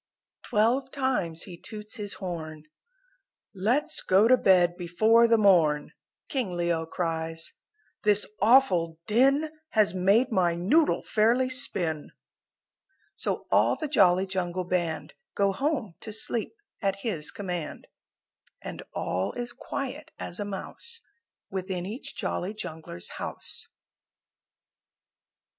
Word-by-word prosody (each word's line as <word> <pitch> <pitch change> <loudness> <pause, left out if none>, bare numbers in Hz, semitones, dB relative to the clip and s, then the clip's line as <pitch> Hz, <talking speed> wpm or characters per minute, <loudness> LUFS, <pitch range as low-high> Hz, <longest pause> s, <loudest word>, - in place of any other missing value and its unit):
Twelve 240 +6 +1
times 250 - -1
he 180 -3 -9
toots 215 +2 -8
his 205 -2 -3
horn 160 -5 -6 0.9
"Let's 245 +11 +1
go 195 +4 +4
to 255 - +7
bed 180 -6 +4
before 215 +7 +4
the 230 0 +5
morn," 165 -8 +4 0.3
King 245 -10 -2
Leo 170 -2 0
cries, 165 -1 -2 0.5
"This 210 -1 +3 0.2
awful 195 -9 +4
din 275 +7 +3 0.2
Has 210 -5 +4
made 200 +8 +3
my 175 -5 +2
noodle 260 - +2
fairly 240 +4 +2
spin!" 175 - -1 1.0
So - - -3
all - - +4
the 310 - -4
Jolly 190 -9 +4
Jungle 185 -1 -2
Band 165 -4 -2 0.2
Go 200 -1 +3
home 265 - -1
to 220 - -8
sleep 220 - -1 0.3
at 195 -1 -1
his 165 -10 -1
command, 180 -6 -5 0.7
And - - -7
all 95 +2 -1
is 240 0 -5
quiet 280 +2 -5
as 175 - -6
a 205 - -2
mouse 460 - -6 0.5
Within 185 -2 -3
each 220 +7 -6
Jolly 195 +5 -3
Jungler's 160 - -7
house. - - -2
195 Hz, 115 wpm, -27 LUFS, 175-235 Hz, 1.0 s, to